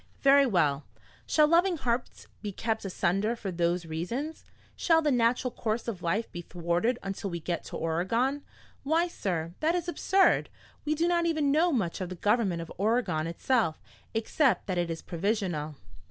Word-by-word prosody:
Very 275 Hz, 0 st, +6 dB
well. 155 Hz, -, +2 dB, 0.4 s
Shall 305 Hz, -, +5 dB
loving 345 Hz, +2 st, +3 dB
hearts 245 Hz, -3 st, -2 dB, 0.2 s
be 210 Hz, -, -4 dB
kept 220 Hz, +3 st, -2 dB
asunder 195 Hz, +4 st, 0 dB
for 205 Hz, -5 st, -5 dB
those 170 Hz, 0 st, 0 dB
reasons? 230 Hz, -, -4 dB, 0.3 s
Shall 325 Hz, -2 st, +3 dB
the 300 Hz, -, +2 dB
natural 245 Hz, +1 st, +2 dB
course 225 Hz, 0 st, -2 dB
of 205 Hz, -6 st, -4 dB
life 195 Hz, +7 st, -1 dB
be 175 Hz, -, -6 dB
thwarted 175 Hz, +8 st, -1 dB
until 195 Hz, 0 st, -4 dB
we 170 Hz, -1 st, -4 dB
get 170 Hz, +1 st, -3 dB
to -, -, -6 dB
Oregon? 230 Hz, -, 0 dB, 0.4 s
Why, 325 Hz, +5 st, +2 dB
sir, 170 Hz, -, -3 dB
that 320 Hz, +3 st, +2 dB
is 350 Hz, -1 st, -2 dB
absurd! 380 Hz, +2 st, +3 dB, 0.4 s
We 305 Hz, +1 st, +1 dB
do 330 Hz, +3 st, +1 dB
not 340 Hz, -1 st, +2 dB
even 310 Hz, -4 st, +1 dB
know 330 Hz, +4 st, +3 dB
much 195 Hz, -, -1 dB
of 180 Hz, -, -3 dB
the 185 Hz, -, -6 dB
government 200 Hz, -3 st, +1 dB
of 165 Hz, -, -11 dB
Oregon 205 Hz, -7 st, +1 dB
itself, 170 Hz, 0 st, 0 dB, 0.4 s
except 255 Hz, +4 st, +2 dB
that 185 Hz, -3 st, -1 dB
it 175 Hz, -1 st, -1 dB
is 165 Hz, 0 st, -5 dB
provisional." 175 Hz, -5 st, -2 dB
220 Hz, 170 wpm, -29 LUFS, 175-280 Hz, 0.4 s, Very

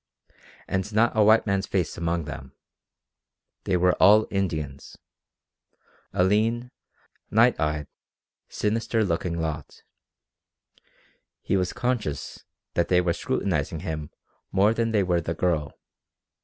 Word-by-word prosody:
And 95 Hz, +3 st, -2 dB
not 115 Hz, +2 st, +3 dB
a 110 Hz, -, +5 dB
white 110 Hz, +2 st, +5 dB
man's 100 Hz, -1 st, 0 dB
face 95 Hz, -3 st, -1 dB
among 85 Hz, 0 st, -1 dB
them. 70 Hz, -3 st, -8 dB, 1.1 s
They 90 Hz, -, +2 dB
were 90 Hz, 0 st, +3 dB
all 105 Hz, +3 st, +7 dB
Indians. 80 Hz, -8 st, -3 dB, 1.1 s
A 90 Hz, -1 st, +2 dB
lean, 115 Hz, +5 st, +1 dB, 0.6 s
night 115 Hz, +3 st, +4 dB
eyed, 75 Hz, -1 st, -1 dB, 0.6 s
sinister 110 Hz, +1 st, 0 dB
looking 85 Hz, -2 st, -1 dB
lot. 80 Hz, -3 st, -5 dB, 1.6 s
He -, -, 0 dB
was 90 Hz, -1 st, 0 dB
conscious 120 Hz, -, -3 dB, 0.3 s
that 85 Hz, -, +1 dB
they 90 Hz, -, +4 dB
were 90 Hz, -1 st, +1 dB
scrutinizing 80 Hz, -, -2 dB
him 80 Hz, -4 st, -4 dB, 0.4 s
more 100 Hz, +3 st, +4 dB
than 115 Hz, 0 st, 0 dB
they 105 Hz, -3 st, +2 dB
were 90 Hz, -2 st, +1 dB
the 85 Hz, +1 st, -3 dB
girl. 80 Hz, -4 st, -1 dB
90 Hz, 120 wpm, -25 LUFS, 80-110 Hz, 1.6 s, all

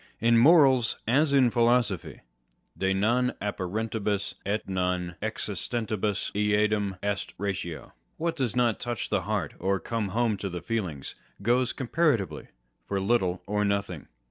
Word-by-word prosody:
In 115 Hz, +1 st, +4 dB
morals, 130 Hz, -2 st, +5 dB
as 140 Hz, +5 st, +3 dB
in 130 Hz, -4 st, +4 dB
philosophy, 120 Hz, -6 st, +1 dB, 0.5 s
De 95 Hz, 0 st, 0 dB
non 120 Hz, +6 st, +1 dB
ajppa 95 Hz, -3 st, -3 dB
rentibus 105 Hz, -2 st, -1 dB
et 105 Hz, +2 st, -1 dB
non 90 Hz, -2 st, -1 dB
existentibus 110 Hz, -3 st, -2 dB
eadem 105 Hz, -1 st, +1 dB
est 100 Hz, -1 st, -2 dB
ratio. 90 Hz, -6 st, -4 dB, 0.2 s
What 165 Hz, 0 st, -1 dB
does 130 Hz, -7 st, -1 dB
not 120 Hz, -3 st, +2 dB
touch 120 Hz, -3 st, -3 dB
the -, -, +2 dB
heart, -, -, -2 dB
or 95 Hz, +1 st, 0 dB
come 110 Hz, +4 st, -2 dB
home 110 Hz, +2 st, 0 dB
to 100 Hz, +1 st, -4 dB
the 90 Hz, -1 st, -6 dB
feelings, 95 Hz, -, -3 dB, 0.3 s
goes 120 Hz, +2 st, +2 dB
com 130 Hz, -, -5 dB
paratively 115 Hz, -, +1 dB, 0.4 s
for 100 Hz, -, -1 dB
little 95 Hz, -3 st, +1 dB
or 105 Hz, +1 st, 0 dB
nothing. 100 Hz, -6 st, -2 dB
105 Hz, 145 wpm, -27 LUFS, 95-120 Hz, 0.5 s, morals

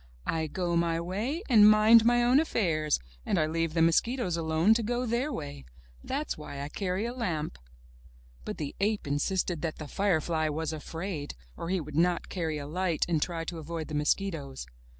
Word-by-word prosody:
"I 160 Hz, -1 st, -1 dB
go 175 Hz, +2 st, -2 dB
my 170 Hz, -1 st, +1 dB
way 215 Hz, -, -3 dB
and 215 Hz, -5 st, +8 dB
mind 215 Hz, +2 st, +7 dB
my 240 Hz, 0 st, +4 dB
own 250 Hz, +3 st, +5 dB
affairs, 165 Hz, -, +1 dB, 0.3 s
and -, -, 0 dB
I 155 Hz, -, +3 dB
leave 165 Hz, +1 st, -1 dB
the 165 Hz, -, +4 dB
mosquitoes 185 Hz, +3 st, +2 dB
alone 165 Hz, +5 st, +3 dB
to 230 Hz, -, +1 dB
go 240 Hz, +3 st, -1 dB
their 245 Hz, +5 st, 0 dB
way. 145 Hz, -, -6 dB, 0.4 s
That's 285 Hz, +3 st, -2 dB
why 145 Hz, -2 st, -7 dB
I 140 Hz, -, -4 dB
carry 190 Hz, +4 st, -2 dB
a 240 Hz, -, -3 dB
lamp." 165 Hz, -, -3 dB, 0.8 s
But -, -, -5 dB
the 145 Hz, -2 st, -5 dB
ape 205 Hz, -1 st, 0 dB
insisted 165 Hz, +3 st, -1 dB
that 160 Hz, -1 st, -2 dB
the 155 Hz, -, -7 dB
firefly 160 Hz, -4 st, +1 dB
was 160 Hz, +1 st, -2 dB
afraid, 160 Hz, -, -5 dB, 0.2 s
or 170 Hz, -, -5 dB
he 190 Hz, 0 st, +1 dB
would 150 Hz, -2 st, -7 dB
not 175 Hz, +2 st, +1 dB
carry 160 Hz, -4 st, -2 dB
a 145 Hz, -, -5 dB
light 170 Hz, +1 st, 0 dB
and 165 Hz, -3 st, +1 dB
try 165 Hz, -1 st, -2 dB
to 165 Hz, 0 st, -5 dB
avoid 160 Hz, 0 st, -5 dB
the -, -, -6 dB
mos 150 Hz, 0 st, +3 dB
quitoes. 150 Hz, -9 st, -6 dB
170 Hz, 190 wpm, -29 LUFS, 155-210 Hz, 0.8 s, and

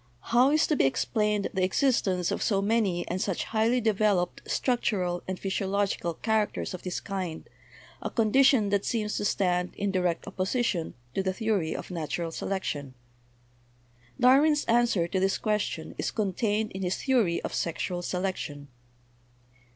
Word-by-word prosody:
How 250 Hz, +3 st, +6 dB
is 305 Hz, +1 st, +3 dB
to 305 Hz, -, +1 dB
be -, -, +2 dB
explained 210 Hz, -, 0 dB
the 190 Hz, -2 st, 0 dB
existence 190 Hz, -, +1 dB
of -, -, -2 dB
so 200 Hz, -3 st, +2 dB
many 195 Hz, -4 st, +1 dB
and 185 Hz, +1 st, -2 dB
such 195 Hz, -4 st, -1 dB
highly 225 Hz, +3 st, +1 dB
developed 210 Hz, -5 st, +1 dB
structural 190 Hz, -8 st, 0 dB
and 185 Hz, -1 st, -4 dB
physiological 195 Hz, -3 st, -1 dB
characters 220 Hz, -1 st, -1 dB
of 185 Hz, -, -6 dB
this 180 Hz, -1 st, -3 dB
kind, 185 Hz, -5 st, -5 dB, 0.5 s
a -, -, -3 dB
condition 235 Hz, 0 st, +4 dB
that 200 Hz, 0 st, +1 dB
seems 215 Hz, -3 st, -1 dB
to -, -, -2 dB
stand 180 Hz, -3 st, 0 dB
in 200 Hz, -1 st, -1 dB
direct 180 Hz, -3 st, 0 dB
oppo 200 Hz, -, -10 dB
sition 215 Hz, -8 st, -1 dB, 0.2 s
to -, -, 0 dB
the 190 Hz, 0 st, -1 dB
theory 205 Hz, -6 st, -1 dB
of -, -, -6 dB
natural 165 Hz, 0 st, -3 dB
selection? 145 Hz, -8 st, -3 dB, 1.2 s
Darwin's 290 Hz, +4 st, +5 dB
an 240 Hz, +1 st, +4 dB
swer 175 Hz, -8 st, 0 dB
to 190 Hz, -, +1 dB
this 195 Hz, +1 st, +1 dB
question 210 Hz, -6 st, -2 dB
is -, -, 0 dB
contained 210 Hz, +1 st, -1 dB
in 190 Hz, -, -6 dB
his 180 Hz, 0 st, -1 dB
theory 235 Hz, -11 st, +2 dB
of -, -, -4 dB
sexual 175 Hz, +1 st, -2 dB
selection. 175 Hz, -6 st, -3 dB
195 Hz, 155 wpm, -28 LUFS, 180-220 Hz, 1.2 s, How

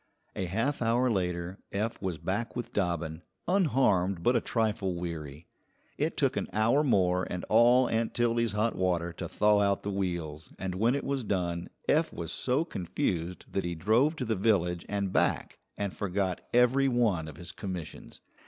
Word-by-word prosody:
A 95 Hz, -, -2 dB
half 115 Hz, +11 st, -1 dB
hour 120 Hz, +2 st, +2 dB
later 90 Hz, -2 st, -2 dB
Eph 105 Hz, +3 st, -2 dB
was 95 Hz, -4 st, -2 dB
back 95 Hz, +9 st, -3 dB
with 120 Hz, -2 st, -5 dB
Dobbin, 85 Hz, -4 st, -1 dB, 0.3 s
unharmed 105 Hz, -, +2 dB
but 125 Hz, -, +3 dB
a 120 Hz, -, +3 dB
trifle 105 Hz, -5 st, 0 dB
weary. 80 Hz, -3 st, -6 dB, 0.5 s
It -, -, -1 dB
took -, -, +2 dB
an -, -, -1 dB
hour 115 Hz, +7 st, +3 dB
more 90 Hz, -8 st, +2 dB
and 90 Hz, -, -4 dB
all 120 Hz, +3 st, +6 dB
Aunt 115 Hz, 0 st, -1 dB
Tildy's 115 Hz, -2 st, +1 dB
hot 110 Hz, +2 st, +1 dB
water 85 Hz, -2 st, 0 dB
to -, -, -6 dB
thaw 105 Hz, 0 st, +3 dB
out 100 Hz, -1 st, +1 dB
the 100 Hz, -, -2 dB
wheels, 85 Hz, -5 st, -3 dB
and 95 Hz, -1 st, -3 dB
when 115 Hz, +7 st, +2 dB
it 140 Hz, -, -2 dB
was 135 Hz, -2 st, -1 dB
done 90 Hz, -4 st, -2 dB, 0.2 s
Eph 160 Hz, +2 st, +3 dB
was 85 Hz, -1 st, -5 dB
so 130 Hz, +6 st, 0 dB
confused 90 Hz, -, -3 dB
that 95 Hz, -, -1 dB
he 85 Hz, 0 st, -3 dB
drove 115 Hz, -, +3 dB
to 130 Hz, -, -3 dB
the 110 Hz, -1 st, 0 dB
village 90 Hz, -4 st, +1 dB
and 100 Hz, -2 st, -1 dB
back -, -, 0 dB, 0.2 s
and 100 Hz, -2 st, -3 dB
forgot 95 Hz, -2 st, -1 dB
every 125 Hz, +3 st, +4 dB
one 110 Hz, -11 st, +1 dB
of 75 Hz, -2 st, -9 dB
his 85 Hz, +1 st, -7 dB
commissions. 90 Hz, -5 st, -7 dB
100 Hz, 175 wpm, -29 LUFS, 90-115 Hz, 0.5 s, all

